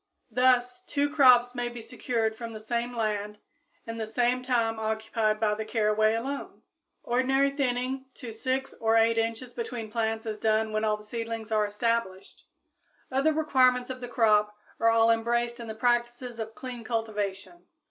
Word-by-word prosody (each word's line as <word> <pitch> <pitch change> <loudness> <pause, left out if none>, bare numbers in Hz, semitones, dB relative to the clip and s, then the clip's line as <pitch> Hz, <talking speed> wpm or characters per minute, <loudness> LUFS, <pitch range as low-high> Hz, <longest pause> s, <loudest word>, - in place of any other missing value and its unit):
Thus 250 +1 +2
two 285 0 0
crops 250 -4 +6
may 245 -1 -2
be 240 0 -8
secured 225 -1 -2
from 230 0 -7
the 215 - -7
same 235 +2 -3
land 210 -1 -2 0.5
in 230 0 -6
the 220 -1 -3
same 245 +3 +1
time 230 -3 0
occupied 220 0 -1
by 215 -1 +2
the 215 +1 -3
caraway 215 0 +2
alone. 270 +5 -5 0.4
Ordinary 265 +3 +2
thinning 260 -1 -1
to 245 -4 -8
6 260 +4 -2
or 225 0 +3
8 225 0 +4
inches 230 +2 -3
between 230 -2 -5
plants 225 -1 -1
is 215 -1 -4
done 220 0 +1
when 215 - 0
the 215 -1 0
seedlings 225 0 -5
are 215 -1 +2
established. 210 -2 -2 0.6
Other 275 +4 +2
requirements 255 -5 +2
of 255 0 -7
the 245 - -5
crop 210 -4 +2 0.2
are 230 - +4
all 225 0 +5
embraced 235 +1 0
in 235 - -7
the 220 - -6
practices 240 0 0
of 220 0 -5
clean 255 -5 -7
cultivation. 220 - -4
230 Hz, 165 wpm, -28 LUFS, 220-250 Hz, 0.6 s, crops